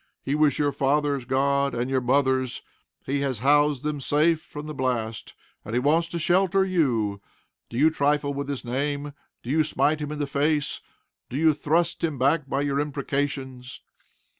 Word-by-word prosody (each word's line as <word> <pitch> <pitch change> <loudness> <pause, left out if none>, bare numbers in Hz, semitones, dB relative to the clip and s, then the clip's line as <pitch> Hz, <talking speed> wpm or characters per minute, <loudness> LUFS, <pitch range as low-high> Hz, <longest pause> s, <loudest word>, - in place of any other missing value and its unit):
He 135 - -1
was 150 -2 +3
your 145 -1 +1
father's 140 -1 0
God, 140 +1 +1
and 120 +1 -1
your 130 -1 0
mother's. 130 0 +1 0.4
He 140 +1 -1
has 135 -3 -1
housed 145 +2 +3
them 150 -1 -2
safe 155 +4 +2
from 150 -1 -9
the 155 - -6
blast, 120 -5 -3 0.3
and 110 - -5
he - - +3
wants 160 +5 +2
to 170 - -4
shelter 190 +3 +2
you. 120 - 0 0.5
Do 115 - -6
you 155 +4 +5
trifle 145 -1 +1
with 140 0 -4
his 140 -3 -4
name? 145 +3 -2 0.3
Do 120 - -4
you 155 +1 +3
smite 150 0 +1
him 150 0 -4
in 150 - -4
the 145 - -1
face? 145 +1 0 0.5
Do 130 - -4
you 160 0 +4
thrust 160 +4 0
him 155 -4 0
back 140 +2 +1
by 135 - 0
your 140 -1 0
imprecations? 140 -3 -3
140 Hz, 180 wpm, -25 LUFS, 130-150 Hz, 0.5 s, you